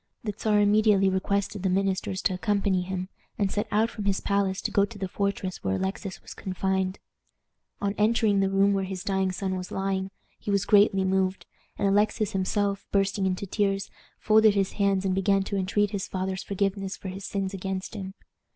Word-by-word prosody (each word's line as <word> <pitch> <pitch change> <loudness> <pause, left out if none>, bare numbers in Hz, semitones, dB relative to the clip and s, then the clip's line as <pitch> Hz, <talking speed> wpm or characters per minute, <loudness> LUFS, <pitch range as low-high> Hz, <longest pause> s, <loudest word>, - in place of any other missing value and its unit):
The 210 -2 -2
Czar 210 -1 +2
immediately 205 -1 +4
requested 200 +1 -1
the 190 - +1
ministers 190 +1 0
to 190 - +2
accompany 190 +1 +1
him, 185 0 -4 0.3
and 200 -2 0
set 210 +2 -1
out 220 +2 +2
from 210 - -6
his 195 -1 +1
palace 200 -1 0
to - - -1
go 200 - +4
to 210 +2 -4
the 190 -1 -3
fortress 200 -1 -2
where 95 0 0
Alexis 190 - -4
was - - -9
confined. 190 0 -1 0.8
On 200 0 0
entering 215 -1 +3
the 195 0 +2
room 195 +1 +3
where 195 -1 0
his 190 -1 -5
dying 190 -1 0
son 190 0 -2
was 180 -1 -5
lying, 195 0 -2 0.3
he - - -7
was 200 -1 +2
greatly 200 -2 +5
moved, 190 0 0 0.3
and 200 - +1
Alexis 210 +1 +2
himself, 200 +1 -1
bursting 195 0 +1
into 185 +1 -2
tears, 195 0 -1 0.3
folded 215 -1 +5
his 195 -1 +1
hands 195 -2 +1
and 190 - +1
began 195 +1 +2
to 200 - -4
entreat 200 +2 +1
his 200 -2 -3
father's 185 0 -3
forgiveness 195 0 -2
for 190 - -7
his 195 +2 -7
sins 195 -1 -3
against 190 +1 -4
him. 195 -2 -6
195 Hz, 190 wpm, -27 LUFS, 190-205 Hz, 0.8 s, greatly